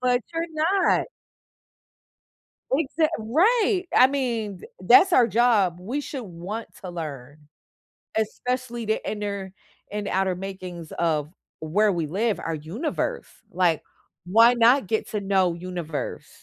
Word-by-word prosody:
But 250 -1 +2
you're 330 +1 -2
not. 340 +5 +2 1.6
Exact 310 +3 +1
right! 375 - +2
I 255 - +8
mean, 235 -8 -2
th - - -12
that's 255 - +6
our 250 -6 +6
job, 210 -7 +3
we 245 +10 -3
should 275 -2 -6
want 190 +5 -6
to 185 - -6
learn. 145 -5 -7 0.8
Especially 240 +2 -2
the 220 +1 0
inner 200 -2 -4 0.4
and 205 -1 -3
outer 190 -1 0
makings 185 -3 -7
of 155 -3 0 0.3
where 200 +7 +2
we 170 -4 -2
live, 205 +7 0
our 165 -1 -3
universe. 230 - -3 0.2
Like, 175 -3 +1 0.4
why 230 +6 +6
not 240 -1 +4
get 220 - -1
to 210 -2 -3
know 190 -3 +2
universe? 170 -3 -5
210 Hz, 130 wpm, -24 LUFS, 180-250 Hz, 1.6 s, I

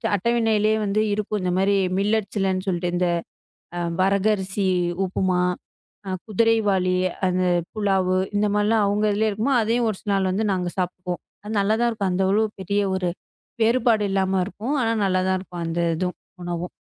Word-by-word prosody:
அட்டவணையிலே 220 0 +2
வந்து 205 +1 +1
இருக்கும் 210 0 -2
இந்த 180 -1 0
மாரி 195 +1 +3 0.2
மில்லட் 205 0 +1 0.4
சொல்லிட்டு 175 -1 0
இந்த 180 0 +1 0.9
வரக 195 +1 +2
அரிசி, 190 0 -1 0.4
உப்புமா, 185 -1 0 0.9
குதிரைவாலி 205 -4 +2 0.3
அந்த 185 0 +1 0.3
புலாவு 190 -3 +1 0.2
இந்த 205 +1 +2 0.2
எல்லாம் 215 0 +3
அவங்க 205 +1 +1
அதுலயே 215 +2 +1
இருக்கும். 235 +7 +1
அதையும் 230 +1 +1
ஒரு 200 - -6
நாள் 195 -1 +1
வந்து 215 +3 0
நாங்க 180 -2 -1
சாப்பிடுவோம். 180 -1 -3 0.4
நல்லா 200 +2 +2
தான் 240 - +3
இருக்கும். 205 -4 -2
அந்த 190 +1 +1
அளவுக்குப் 210 +1 0
பெரிய 200 +2 0
ஒரு 185 -1 -1 0.5
வேறுபாடு 230 -2 +3
இல்லாம 190 -1 +1
இருக்கும். 225 +7 -4
ஆனா 225 -1 +1
நல்லா 185 -1 +2
தான் 190 0 +2
இருக்கும். 175 -2 -7
அந்த 165 +1 -2 0.2
இதுவும் 180 +2 -3 0.2
உணவும். 175 0 -4
200 Hz, 150 wpm, -23 LUFS, 185-215 Hz, 0.9 s, மாரி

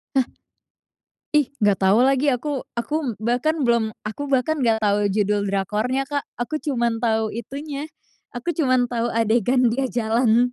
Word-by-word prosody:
Nah. 260 -2 +4 1.1
Ih, 295 -3 +3 0.2
nggak 200 -2 +3
tahu 195 +3 +4
lagi 275 +2 +2
aku. 270 +1 0 0.2
Aku 260 -2 -2
bahkan 250 +7 0
belum 235 -2 +2 0.2
aku 280 +7 -5
bahkan 275 +3 +1
nggak 220 -3 +2
tahu 205 0 +2
judul 205 0 0
drakornya, 215 +7 -1
Kak. 285 0 -3
Aku 300 +6 -3
cuma 240 -5 0
tahu 225 -1 0
itunya, 280 +5 -6 0.5
aku 345 +8 -2
cuma 260 -6 +2
tahu 240 -1 -1
adegan 230 +3 +2
dia 265 +1 0
jalan. 235 +1 +2
240 Hz, 150 wpm, -22 LUFS, 220-275 Hz, 1.1 s, Nah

